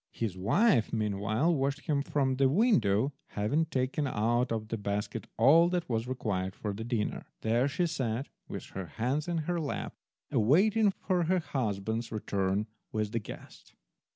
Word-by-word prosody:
His 110 Hz, -5 st, -2 dB
wife 115 Hz, -, +3 dB
meanwhile 110 Hz, -, +1 dB
watched 140 Hz, 0 st, 0 dB
him 145 Hz, -3 st, 0 dB
from 135 Hz, -2 st, 0 dB
the 135 Hz, -1 st, +4 dB
window, 135 Hz, -, +3 dB, 0.2 s
having 120 Hz, +11 st, +2 dB
taken 135 Hz, +1 st, -1 dB
out 120 Hz, +1 st, +1 dB
of 110 Hz, -1 st, -2 dB
the 115 Hz, -, -2 dB
basket 100 Hz, 0 st, -3 dB
all 160 Hz, +9 st, +6 dB
that 175 Hz, -1 st, -1 dB
was 115 Hz, -1 st, -1 dB
required 100 Hz, -7 st, -2 dB
for 105 Hz, -2 st, -3 dB
the 110 Hz, +3 st, -5 dB
dinner. 115 Hz, -3 st, -2 dB
There 115 Hz, +4 st, +2 dB
she 175 Hz, +5 st, 0 dB
sat, 130 Hz, -6 st, -2 dB, 0.2 s
with -, -, -6 dB
her 95 Hz, -2 st, -6 dB
hands 130 Hz, +7 st, 0 dB
in 175 Hz, -1 st, -1 dB
her 175 Hz, 0 st, 0 dB
lap, 150 Hz, -3 st, -3 dB, 0.4 s
awaiting 200 Hz, -, +4 dB
her 180 Hz, 0 st, +2 dB
husband's 115 Hz, -, -2 dB
return 100 Hz, -1 st, -1 dB, 0.3 s
with 110 Hz, -1 st, -1 dB
the 115 Hz, -, 0 dB
guest. 105 Hz, -, -11 dB
120 Hz, 155 wpm, -30 LUFS, 105-150 Hz, 0.4 s, all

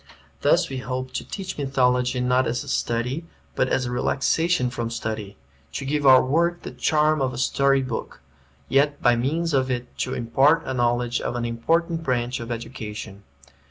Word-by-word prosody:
Thus -, -, +3 dB
we 135 Hz, -, -5 dB
hope 130 Hz, 0 st, -4 dB
to -, -, -3 dB
teach 190 Hz, -5 st, -6 dB
mythology 125 Hz, -2 st, +1 dB
not 125 Hz, +1 st, +2 dB
as 120 Hz, -, -2 dB
a -, -, -13 dB
study, 125 Hz, +8 st, -1 dB, 0.3 s
but -, -, +1 dB
as 130 Hz, -, +1 dB
a 120 Hz, -, -3 dB
relaxation 135 Hz, +3 st, +1 dB
from 115 Hz, -1 st, -3 dB
study; 110 Hz, -3 st, -5 dB, 0.4 s
to 140 Hz, -, -4 dB
give 145 Hz, 0 st, +1 dB
our 130 Hz, -1 st, +7 dB
work 170 Hz, +5 st, +1 dB
the -, -, -6 dB
charm 155 Hz, -1 st, +2 dB
of 130 Hz, -1 st, 0 dB
a -, -, -6 dB
story 135 Hz, +1 st, +2 dB
book, 125 Hz, -3 st, -5 dB, 0.5 s
yet 145 Hz, +1 st, +2 dB
by 120 Hz, -1 st, +4 dB
means 155 Hz, +7 st, -1 dB
of 130 Hz, -1 st, +2 dB
it 125 Hz, -1 st, -4 dB
to -, -, -1 dB
impart 135 Hz, +7 st, +3 dB
a 130 Hz, -, -3 dB
knowledge 120 Hz, -1 st, 0 dB
of -, -, -3 dB
an 120 Hz, -1 st, -2 dB
important 165 Hz, +8 st, 0 dB
branch 125 Hz, -4 st, -1 dB
of 115 Hz, 0 st, -7 dB
education. 110 Hz, -4 st, -6 dB
130 Hz, 180 wpm, -24 LUFS, 120-145 Hz, 0.5 s, our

